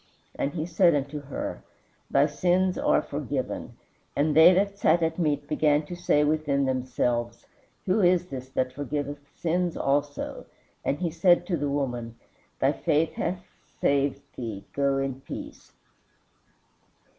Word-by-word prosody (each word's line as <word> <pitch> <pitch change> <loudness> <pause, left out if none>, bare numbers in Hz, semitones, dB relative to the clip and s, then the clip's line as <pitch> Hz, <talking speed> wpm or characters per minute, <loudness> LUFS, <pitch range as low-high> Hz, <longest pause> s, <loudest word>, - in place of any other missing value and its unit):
And 140 - -2
he 155 -2 -2
said 170 -1 +4
unto 145 +1 -2
her, 140 -1 -5 0.5
Thy 140 - +4
sins 180 +5 +1
are - - +2
forgiven. 140 -2 -4 0.4
And 150 +1 +1
they 160 +3 +9
that 200 +2 +1
sat 165 +2 +3
at 160 +1 -1
meat 145 -3 0
began 150 0 +2
to 175 - -6
say 175 -4 +2
within 150 -2 +1
themselves, 125 -2 -1 0.4
Who 195 +3 +2
is 180 -1 +4
this 130 -2 -7
that 130 -1 -1
forgiveth 145 +1 -3 0.2
sins 175 +1 -1
also? 145 +1 -1 0.4
And 140 - 0
he 175 -1 -2
said 175 +1 +4
to 175 - 0
the 145 -2 -1
woman, 125 -5 -2 0.4
Thy - - +3
faith 155 +2 +1
hath 180 +1 -3 0.3
saved 140 -1 +1
thee; 110 -5 -6
go 140 -1 +1
in 135 -1 -2
peace." - - -9
145 Hz, 145 wpm, -27 LUFS, 135-170 Hz, 0.5 s, they